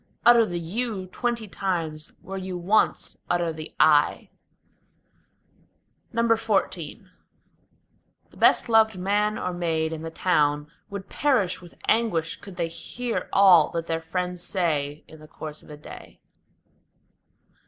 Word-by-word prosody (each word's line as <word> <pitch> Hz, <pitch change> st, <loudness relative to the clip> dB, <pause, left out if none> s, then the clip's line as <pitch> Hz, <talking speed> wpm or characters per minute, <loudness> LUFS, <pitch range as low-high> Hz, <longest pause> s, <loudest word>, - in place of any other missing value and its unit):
Utter 235 Hz, -2 st, +7 dB
the 175 Hz, 0 st, -3 dB
You 200 Hz, +3 st, -3 dB
twenty 235 Hz, -1 st, -2 dB
times, 165 Hz, -6 st, -3 dB
where 195 Hz, -, -7 dB
you 185 Hz, -1 st, -5 dB
once 200 Hz, +5 st, +1 dB
utter 175 Hz, -2 st, +1 dB
the 155 Hz, 0 st, -8 dB
I. 150 Hz, -1 st, +4 dB, 1.8 s
XIV 225 Hz, -, 0 dB, 1.2 s
The -, -, -19 dB
best -, -, +4 dB
loved 220 Hz, -3 st, +4 dB
man 205 Hz, +3 st, +1 dB
or 180 Hz, -, -3 dB
maid 165 Hz, -2 st, -1 dB
in 160 Hz, -, -6 dB
the 165 Hz, -, -5 dB
town 150 Hz, -4 st, +1 dB, 0.2 s
would 200 Hz, -2 st, -7 dB
perish 240 Hz, -13 st, +1 dB
with 175 Hz, -1 st, -15 dB
anguish 215 Hz, -9 st, +1 dB
Could 195 Hz, -2 st, -10 dB
they 170 Hz, -2 st, -1 dB
hear 230 Hz, +9 st, -4 dB
all 185 Hz, -6 st, +6 dB
that 165 Hz, -1 st, -2 dB
their 165 Hz, -1 st, -2 dB
friends 180 Hz, +2 st, -3 dB
say 155 Hz, -6 st, -1 dB
in 160 Hz, -, -14 dB
the 155 Hz, -, -13 dB
course 155 Hz, 0 st, -8 dB
of -, -, -18 dB
a 150 Hz, -, -9 dB
day. 150 Hz, -, -12 dB
180 Hz, 130 wpm, -25 LUFS, 160-210 Hz, 1.8 s, Utter